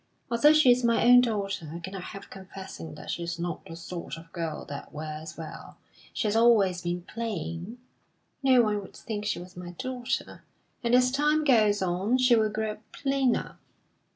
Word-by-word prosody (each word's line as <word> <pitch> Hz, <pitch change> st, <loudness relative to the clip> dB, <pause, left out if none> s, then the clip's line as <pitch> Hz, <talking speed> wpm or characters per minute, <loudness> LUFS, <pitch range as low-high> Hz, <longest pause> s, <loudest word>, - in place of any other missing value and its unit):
Although 295 Hz, +6 st, +6 dB
she 310 Hz, -5 st, +6 dB
is 245 Hz, +1 st, +3 dB
my 230 Hz, -2 st, +3 dB
own 245 Hz, +1 st, +9 dB
daughter, 200 Hz, -9 st, -2 dB
I -, -, -3 dB
cannot 190 Hz, +2 st, -6 dB
help 195 Hz, -1 st, -9 dB
confessing 190 Hz, -4 st, -9 dB
that -, -, -6 dB
she -, -, -3 dB
is 170 Hz, 0 st, -3 dB
not 170 Hz, -1 st, -4 dB
the 165 Hz, -, -8 dB
sort 170 Hz, -3 st, -6 dB
of 165 Hz, 0 st, -13 dB
girl 165 Hz, -3 st, -4 dB
that 140 Hz, -1 st, -8 dB
wears 155 Hz, +1 st, -7 dB
well; 160 Hz, -2 st, -9 dB, 0.3 s
she -, -, -2 dB
has 210 Hz, -, 0 dB
always 215 Hz, -6 st, +4 dB
been 175 Hz, 0 st, -3 dB
plain 190 Hz, -2 st, -5 dB, 0.6 s
(no 260 Hz, -3 st, +5 dB
one 210 Hz, -2 st, 0 dB
would 195 Hz, -, -12 dB
think 210 Hz, -2 st, -5 dB
she -, -, 0 dB
was 180 Hz, +1 st, -10 dB
my 175 Hz, 0 st, -8 dB
daughter) 255 Hz, +4 st, -4 dB, 0.4 s
and 235 Hz, +1 st, +3 dB
as 250 Hz, 0 st, +4 dB
time 300 Hz, +3 st, +2 dB
goes 215 Hz, -8 st, +4 dB
on, 190 Hz, +7 st, +1 dB
she 250 Hz, -1 st, +5 dB
will 220 Hz, -1 st, +3 dB
grow 215 Hz, 0 st, -3 dB
plainer. 270 Hz, -3 st, 0 dB
205 Hz, 180 wpm, -28 LUFS, 175-240 Hz, 0.6 s, own